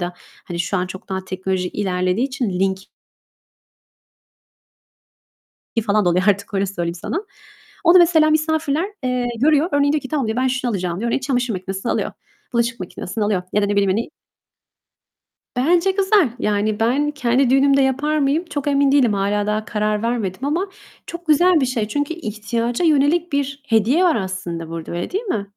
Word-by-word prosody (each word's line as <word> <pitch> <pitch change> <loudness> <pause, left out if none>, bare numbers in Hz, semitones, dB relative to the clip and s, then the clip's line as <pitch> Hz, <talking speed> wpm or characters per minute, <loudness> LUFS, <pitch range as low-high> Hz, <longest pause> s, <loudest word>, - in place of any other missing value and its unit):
da, 175 0 -3 0.3
hani 175 - -6
şu 185 +3 -1
an 180 0 -1
çok 185 +1 -10
daha 190 -1 -3
teknoloji 185 -1 -2
ilerlediği 185 +4 0
için, 255 -5 -2
link 190 +1 0 3.0
i 230 - +2
falan 210 -1 +1
da 175 - +4
oluyor 180 +1 +2
artık, 200 0 +1
öyle 195 0 +1
söyleyeyim 175 -3 -3
sana. 340 - -4 0.6
Onu 340 +2 +7
mesela 325 -3 +5
misafirler, 315 0 +1 0.2
eee, 250 -1 0
görüyor, 300 +4 +3
örneği 285 0 +3
diyor 305 - 0
ki 265 - -7
"Tamam." 280 -6 -1
diyor, 220 +2 -2
"Ben 260 - +2
şunu 255 -1 -1
alacağım." 180 -3 -2
diyor, 235 +2 -1
oraya - - +1
çamaşır 250 -3 -1
makinesini 190 +4 -3
alıyor, - - -1 0.4
bulaşık 235 -1 0
makinesini 185 +3 -4
alıyor 205 -3 0
ya 210 - +3
da 205 - +2
ne 205 - -1
bileyim, 200 -1 +2
hani 220 +5 -2 1.4
Bence 340 +9 +3
güzel, 390 - +3
yani, 210 0 0
ben 270 +6 +1
kendi 260 -2 +1
düğünümde 275 +1 +4
yapar 280 +4 +1
mıyım? 295 +4 +1
Çok 290 -4 -4
emin 280 -1 +3
değilim, 260 -6 +4
hâlâ 205 +1 0
daha 215 +1 -1
karar 210 -1 -1
vermedim 230 -1 -2
ama 335 +7 0 0.4
çok 340 0 -8
güzel 335 +2 +4
bir 260 - +3
şey, 235 -4 -1
çünkü 290 +6 -2
ihtiyaca 235 - -2
yönelik 315 +3 +2
bir 280 0 -2
hediye 230 - +3
var 350 -3 +4
aslında 185 -5 -4
burada, 165 -1 -6
öyle 175 0 -4
değil 400 +5 -2
mi? 215 - -2
235 Hz, 175 wpm, -20 LUFS, 200-290 Hz, 3.0 s, Onu